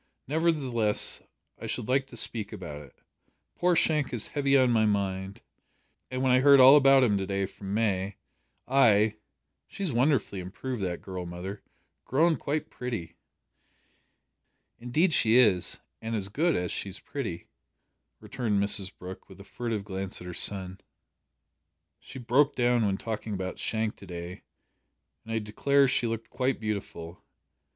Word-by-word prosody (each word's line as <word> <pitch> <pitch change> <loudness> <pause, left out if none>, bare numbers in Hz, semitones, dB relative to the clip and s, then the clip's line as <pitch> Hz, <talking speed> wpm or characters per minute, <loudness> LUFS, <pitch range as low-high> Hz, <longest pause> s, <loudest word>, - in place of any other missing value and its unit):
Nevertheless, 135 -8 +1 0.4
I - - -6
should - - -3
like 135 +1 +1
to 120 - -9
speak 110 -2 -2
about 75 -2 -7
it. 70 -3 -16 0.6
Poor 180 0 +2
Shank 150 -4 +1
is 120 -4 -3
heavy 140 -1 +2
on 130 -2 +4
my 110 -2 +3
mind, 100 -2 -1 0.7
and 130 +1 -3
when 130 - +3
I 125 - +5
heard 140 +1 +7
all 130 +2 +9
about 135 -2 +6
him 105 -5 +2
to 95 - -3
day 100 0 -1
from 100 +1 -6
May, 100 -3 0 0.5
I. 110 -5 +4 0.5
She's 190 -8 -4
wonderfully 125 -5 +1
improved, 105 +6 -5
that 90 -2 -3
girl, 90 -2 -6
mother. 90 +4 -7 0.4
Grown 160 +5 +2
quite 150 +1 -3
pretty?" 110 -10 -5 1.6
"Indeed 150 +9 +1
she 115 -3 +4
is 105 -8 +3 0.2
and 115 0 -3
as 100 -2 -2
good 160 - +1
as 90 0 -2
she's 95 -2 -4
pretty," 110 -12 -6 0.7
returned 110 -5 -2
Mrs 100 -1 +2
Brooke, 90 +1 -10
with - - -14
a - - -10
furtive 110 +1 -4
glance 95 -1 -5
at 90 - -10
her 90 - -6
son. 95 0 -1 1.2
"She 130 +2 -11
broke 135 +4 +2
down 120 -3 +2
when 95 -1 0
talking 110 -1 -4
about 95 -1 -5
Shank 110 -1 -2
to 100 - -13
day, 90 +1 -7 0.8
and 115 - -9
I - - 0
declare 135 +6 +2
she 125 -1 +1
looked 115 0 -5
quite 130 +1 -1
beautiful! 100 -6 -5
110 Hz, 155 wpm, -28 LUFS, 95-130 Hz, 1.6 s, all